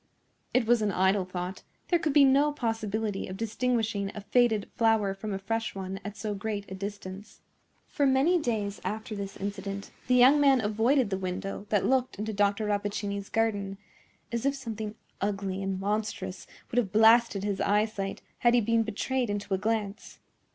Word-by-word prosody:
It 255 -2 +2
was 235 0 +4
an 210 -1 +1
idle 190 +1 +2
thought; 180 +1 -5 0.3
there 345 - +3
could 320 -2 0
be 285 -1 +7
no 280 +2 +4
possibility 220 -5 -2
of 185 - -6
distinguishing 225 -3 -1
a 210 - -5
faded 225 -1 +2
flower 225 -4 +3
from 210 +2 -6
a 195 - -1
fresh 225 +3 -3
one 190 0 -5
at 205 +1 -7
so 215 -2 -3
great 205 0 -3
a - - -3
distance. 200 +1 -7 0.5
For 290 -6 +1
many 275 +7 +4
days 215 -7 -2
after 220 +1 -4
this 200 -1 -6
incident 200 0 -5 0.2
the 250 - +4
young 260 +4 +7
man 275 -2 +5
avoided 225 +3 +2
the 190 - -1
window 195 +2 -4
that 205 -3 +2
looked 260 -3 +1
into 215 +2 -3
Dr. 205 +1 +1
Rappaccini's 205 -1 -2
garden, 205 -3 0 0.5
as 235 -1 -2
if 275 +1 +1
something 220 -5 -5 0.3
ugly 195 -1 -2
and 195 -1 -2
monstrous 205 -2 -3 0.2
would 245 - +3
have 205 -6 -1
blasted 220 -1 +5
his 200 -1 -1
eyesight 205 -1 0 0.2
had 240 0 +4
he 240 - +4
been 230 +1 +2
betrayed 235 +3 -1
into 205 -1 -2
a 190 - +1
glance. 215 -1 -2
210 Hz, 175 wpm, -28 LUFS, 200-230 Hz, 0.5 s, be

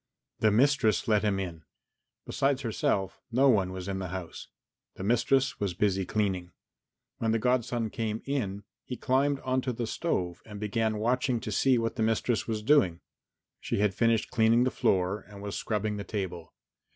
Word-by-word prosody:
The 110 - +4
mistress 115 -2 +3
let 105 -2 +3
him 100 -2 0
in. 85 -4 -5 0.6
Besides 135 0 0
herself 100 -4 -1
no 135 +4 +4
one 95 -6 +3
was 95 0 -6
in 95 -1 -2
the 95 - -4
house. 90 -2 -7 0.5
The - - -7
mistress 120 +5 +2
was 100 -4 -2
busy 95 -1 +1
cleaning. 95 -4 -1 0.7
When 110 -1 +1
the - - +3
godson 120 -1 0
came 110 -1 -3
in 105 -8 -2 0.2
he 125 - -6
climbed 140 +2 +1
on 130 0 0
to 130 - -2
the 120 0 -3
stove 90 - -2
and 105 -2 -9
began 110 +1 0
watching 125 +2 +1
to 110 - -5
see 130 +5 +3
what 115 +1 -2
the - - -1
mistress 115 +1 +1
was 110 -2 -2
doing. 105 - +3 0.6
She - - -2
had 100 -1 +2
finished 115 +1 +1
cleaning 115 +2 +4
the 130 - +1
floor 95 -1 +1
and 100 -1 -11
was 100 0 -5
scrubbing 105 -1 -2
the 100 - -4
table. 95 -6 -5
110 Hz, 175 wpm, -29 LUFS, 95-120 Hz, 0.7 s, The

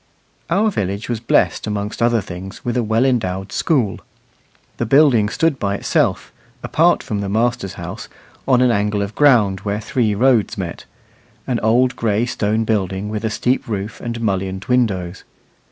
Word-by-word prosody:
Our 210 +5 +2
village 100 - -3
was 120 -2 -1
blessed 115 - +1
amongst 105 +1 -3
other 115 -1 +3
things 95 +2 -9
with 120 - -1
a 125 - +2
well 110 +3 +1
endowed 95 -7 -1
school. 125 -11 0 0.8
The 120 - -1
building 130 -6 +4
stood 155 +3 0
by 100 -1 -1
itself, - - 0 0.3
apart - - +2
from 105 -1 -3
the 100 - -3
master's 115 -1 -1
house, - - -7 0.4
on 125 -2 +4
an 125 - +4
angle 105 -1 0
of 100 +2 -5
ground 115 -10 +4
where 100 +1 -3
three 110 -1 0
roads 120 -1 +2
met 90 -4 -5 0.6
an 125 -3 -1
old 125 +3 +2
gray 110 0 0
stone 110 -2 0
building 100 -2 -1
with 105 0 -4
a 110 - 0
steep 125 +5 -1
roof 105 -1 -4
and 115 -1 -4
mullioned 95 -3 -2
windows. 95 -8 0
110 Hz, 165 wpm, -19 LUFS, 100-120 Hz, 0.8 s, building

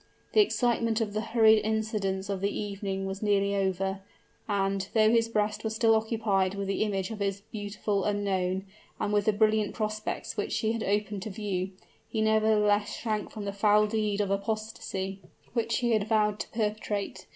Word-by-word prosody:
The 430 - +7
excitement 235 - +1
of 215 -3 -2
the 215 - -1
hurried 220 -1 +5
incidents 210 -3 -1
of 195 -2 -3
the 200 - +1
evening 200 -2 -3
was 195 0 -4
nearly 200 -1 +2
over, 190 0 0 0.5
and, 195 -1 0
though 215 0 +5
his 230 -1 +3
breast 210 -1 0
was 220 -1 -2
still 225 0 +4
occupied 215 -4 +1
with 200 -1 -3
the 195 - -1
image 200 -1 -1
of 220 - -6
his 200 0 -1
beautiful 205 -1 -2
unknown, 190 -2 0 0.3
and 210 - -1
with 205 -1 +2
the 215 - +5
brilliant 215 0 +2
prospects 215 0 -3
which - - -2
she 220 - +1
had 230 -1 -2
opened 205 -1 -1
to 215 - -5
view, 190 -2 -3 0.4
he 220 - -2
nevertheless 215 -1 +3
shrank 215 -3 -2
from 210 -2 -7
the 200 - -3
foul 210 +1 +4
deed 210 -1 0
of 200 -1 -1
apostasy 200 -2 -3 0.3
which 230 -1 0
he 240 -1 +1
had 215 -2 +2
vowed 210 -1 +2
to - - -3
perpetrate. 210 -2 -3
210 Hz, 180 wpm, -28 LUFS, 200-220 Hz, 0.5 s, The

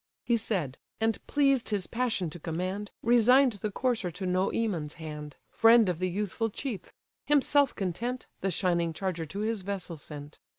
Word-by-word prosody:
He 235 - +2
said; 185 - -1 0.2
and 225 0 0
pleased 275 -4 +2
his 205 -3 -1
passion 225 -9 -1
to 175 - -8
command, 185 +6 -3
Resign'd 245 +2 +5
the 215 - -1
courser 225 -3 0
to 185 +3 -6
Noemon's 185 -3 0
hand, 150 -3 -7 0.2
Friend 225 -1 +6
of 175 -3 -1
the 185 0 0
youthful 210 +4 -1
chief: 220 -4 -5 0.4
himself 285 -1 +4
content, 230 +7 -3
The 195 - 0
shining 170 -2 +1
charger 175 -2 -3
to 200 +7 -5
his 220 -1 -1
vessel 185 -3 -4
sent. 145 0 -9
200 Hz, 160 wpm, -29 LUFS, 170-230 Hz, 0.4 s, Friend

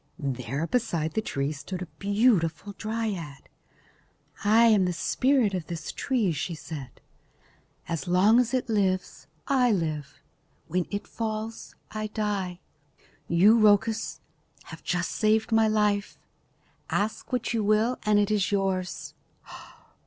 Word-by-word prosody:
There 135 - -3
beside 170 -8 -1
the 220 - 0
tree 140 -8 -2
stood 165 +5 -6
a 175 - -15
beautiful 200 -3 +1
dryad. 210 -11 -4 1.0
"I 220 +3 +5
am 210 -5 +5
the 180 - 0
spirit 250 +4 +2
of 175 -5 -3
this 165 -2 -5
tree," 235 -9 0
she 160 +2 -3
said. 145 -5 -8 0.9
"As 165 -3 -3
long 195 +6 +5
as 240 -2 +1
it 255 -1 0
lives, 195 -4 -1 0.2
I 255 -3 +3
live. 155 -7 -2 0.5
When 180 +1 -1
it 205 +1 -4
falls, 220 0 -5 0.2
I 215 0 -3
die. 205 -4 -3 0.7
You, 200 +7 +5
Rhoecus, 215 +1 +2 0.5
have - - -11
just 180 0 -1
saved 220 +1 +1
my 225 0 +4
life. 210 -1 +1 0.7
Ask 215 +5 -2
what 245 -2 -1
you 225 -2 0
will 215 +4 +2
and 210 -1 +3
it 205 0 +2
is 210 -2 +1
yours." 190 -2 -1
205 Hz, 130 wpm, -27 LUFS, 170-220 Hz, 1.0 s, I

